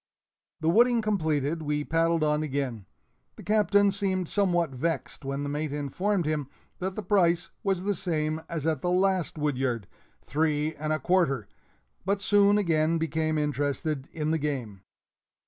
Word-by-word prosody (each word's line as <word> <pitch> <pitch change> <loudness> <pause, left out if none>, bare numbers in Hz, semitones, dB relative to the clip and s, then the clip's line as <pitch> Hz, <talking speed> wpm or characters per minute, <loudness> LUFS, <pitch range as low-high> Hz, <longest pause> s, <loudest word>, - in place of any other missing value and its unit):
The 160 - -1
wooding 235 +4 +4
completed, 160 -6 0
we 150 -1 -1
paddled 165 +1 +1
on 150 0 +2
again. 135 -8 -3 0.5
The - - -11
Captain 205 -1 +3
seemed 190 -2 -1
somewhat 175 -6 +1
vexed 140 +1 -3
when 140 +1 -3
the 145 - -3
mate 150 +1 -2
informed 170 +7 -1
him 150 -3 -1 0.3
that 190 +1 -3
the 215 - -4
price 175 -3 +2
was 195 -4 0
the 205 +1 +1
same 160 -4 -2
as 165 -4 -3
at 155 -5 0
the 175 - 0
last 185 -2 +1
woodyard 130 -7 -1 0.4
three 155 0 0
and 155 0 -4
a 155 - +2
quarter; 150 - +1 0.6
but 200 +2 0
soon 205 +1 +4
again 165 -4 +2
became 160 -1 0
interested 145 0 -1
in 155 -1 -2
the 160 - +1
game. 125 -10 -3
160 Hz, 155 wpm, -27 LUFS, 145-185 Hz, 0.6 s, wooding